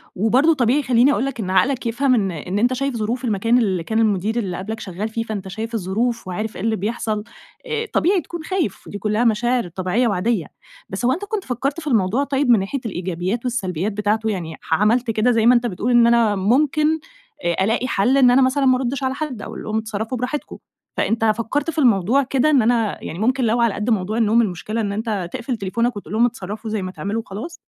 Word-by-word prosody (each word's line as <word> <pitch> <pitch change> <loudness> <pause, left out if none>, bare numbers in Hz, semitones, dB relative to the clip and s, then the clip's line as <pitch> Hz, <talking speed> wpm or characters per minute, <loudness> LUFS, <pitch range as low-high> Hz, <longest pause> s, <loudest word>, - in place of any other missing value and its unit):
وبرضو 250 - +3
طبيعي 265 +1 +2
خَلّيني 250 +1 +4
أقول 270 - 0
لك 275 -3 -4
إن 190 -4 -3
عقلك 260 +7 +2
يفهم 255 +3 +2
إن 195 -5 0
إن 180 +5 -3
أنتَ 245 +3 +2
شايف 275 0 -2
ظروف 235 +4 -2
المكان 230 +2 +2
اللي 190 -8 +1
كان 220 +6 -1
المدير 215 0 +1
اللي 185 -6 -3
قَبْلك 220 +4 -5
شَغّال 195 +3 -4
فيه 225 +1 -3
فأنت 210 -4 -5
شايف 220 +5 -5
الظروف 225 +3 -1
وعارف 215 +4 -4
إيه - - -6
اللي 225 0 +1
بيحصل، 215 +1 -2 0.4
آآ، 455 -2 -2
طبيعي 370 +1 +3
تكون 340 +1 -8
خايف، 345 - -2
دي 205 - -5
كلّها 210 +3 0
مشاعر 240 0 +1
طبيعية 185 +7 0
وعاديّة. 215 +3 0 0.4
بس - - -3
هو 250 - +4
أنت 375 +8 -4
كنت 415 -2 -3
فكَّرت 270 +4 -2
في 315 - -9
الموضوع 225 0 +2
طيِّب 275 -1 0
من 235 -3 +6
ناحية 200 +9 -3
الإيجابيات 185 +1 -2
والسلبيات 195 -6 -2
بتاعته، 210 +2 0
يعني 170 -6 -4
ح - - -3
عملت 225 +7 +2
كده 220 +3 +2
زَي 225 -2 +2
ما 245 +1 +7
أنتَ 240 0 +2
بتقول 220 +4 -2
إن 240 -1 +6
أنا 235 -3 +3
ممكن، 300 +10 +2 0.5
آآ 175 +2 +1
ألاقي 225 +5 0
حل 250 +4 +2
إن 255 -3 +6
أنا 260 +2 +5
مثلًا 270 +2 +2
ما 255 -1 +5
أردش 265 +1 -2
على 260 0 0
حد، 270 -6 -5
أقول - - -7
لهم 215 0 -2
اتصرَّفوا 220 +2 -3
براحتكم، 250 +5 -4 0.4
فأنتَ 225 0 +1
فكّرت 230 +8 0
في 320 - -13
الموضوع 240 - +3
كده؟ 270 +2 +1
إن 285 -4 +4
أنا 225 -2 0
يعني 165 - -6
ممكن 255 +4 +1
لو 235 +1 +2
على 230 -3 +2
قَدّ 210 +4 -3
موضوع 215 -1 0
النوم، 230 0 +4
المشكلة 215 +2 -2
إن 205 -2 -2
أنت 205 -4 -3
تِقفل 240 0 -3
تليفونَك 230 +4 -1
وتقول 205 - -8
لهم 230 +2 +4
اتصرَّفوا 220 -1 -5
زي 215 -1 -2
ما 185 0 -4
تعملوا 200 +4 -3
وخلاص؟ 220 - -7
225 Hz, 220 wpm, -21 LUFS, 205-255 Hz, 0.5 s, ما